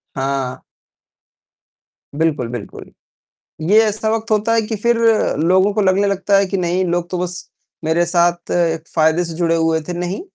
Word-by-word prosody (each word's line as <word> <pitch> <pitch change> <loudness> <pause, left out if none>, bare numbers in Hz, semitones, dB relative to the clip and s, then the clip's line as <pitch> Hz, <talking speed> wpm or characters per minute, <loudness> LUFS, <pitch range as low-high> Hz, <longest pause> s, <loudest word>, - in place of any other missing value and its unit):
हाँ। 135 -1 -3 1.5
बिल्कुल, 150 -5 0
बिल्कुल। 120 -3 -8 0.8
ये 215 - +6
ऐसा 215 0 -1
वक़्त 225 0 -2
होता 215 +1 +1
है 225 - +2
कि 220 +1 -4
फिर 235 +3 +1 0.4
लोगों 185 +5 +3
को 215 - +1
लगने 195 +1 +2
लगता 200 0 +1
है, 195 0 +3
कि 195 - -2
नहीं, 180 0 0
लोग 175 -1 -1
तो 180 - -2
बस 180 0 -5 0.4
मेरे 160 +2 +2
साथ 175 0 +1 0.4
फ़ायदे 160 +2 +2
से 165 -1 -6
जुड़े 165 0 +1
हुए 160 0 +1
थे। - - -2
नहीं, 180 +2 -3
175 Hz, 160 wpm, -18 LUFS, 165-200 Hz, 1.5 s, ये